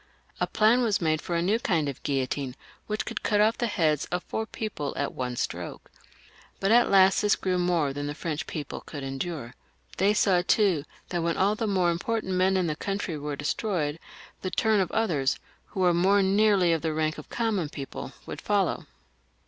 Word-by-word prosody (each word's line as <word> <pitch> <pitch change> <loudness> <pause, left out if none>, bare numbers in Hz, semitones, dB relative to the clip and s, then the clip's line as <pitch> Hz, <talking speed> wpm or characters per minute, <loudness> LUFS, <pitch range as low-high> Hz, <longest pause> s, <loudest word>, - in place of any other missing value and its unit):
A - - +1
plan 225 +3 +4
was 215 -5 +2
made 155 -3 +1
for 175 - -3
a 170 - +1
new 210 +6 +2
kind 165 -10 +1
of 140 -2 -5
guiUotine, 135 -1 -2 0.3
which 215 0 -2
could 230 - -4
cut 210 -2 +1
off 215 +2 +3
the 240 - +1
heads 155 -8 +1
of 180 0 -3
four 220 0 -3
people 200 -13 -4
at 140 0 -1
one 125 -1 -3
stroke. - - -5 0.7
But 195 +2 +1
at 240 +1 +5
last 190 -1 +5
this 210 -1 +3
grew 185 -1 -1
more 170 -6 +1
than 145 +1 -4
the 145 - -4
French 155 -1 -4
people 150 -2 -5
could 145 -2 -8
endure. 135 -1 -4 0.4
They 200 +3 +3
saw, 190 -4 +4
too, 180 -5 +2 0.2
that 175 -1 -1
when 170 0 0
aU 200 +2 +3
the 220 +1 -2
more 185 -4 +2
important 190 +3 -2
men 185 +1 +3
in 185 - +1
the 155 -2 -1
country 195 -1 -3
were 150 0 -4
destroyed, 150 0 -1 0.4
the 185 - -2
turn 220 +2 +2
of 185 - 0
others, 155 -12 +1 0.3
who 190 - -4
were 180 -1 +4
more 195 +4 +4
nearly 195 -3 +4
of 165 - 0
the 160 -1 -1
rank 155 0 -1
of 155 - -11
common 215 -9 -1
people, 140 -2 -7
would - - -7
follow. - - 0
180 Hz, 200 wpm, -27 LUFS, 150-205 Hz, 0.7 s, at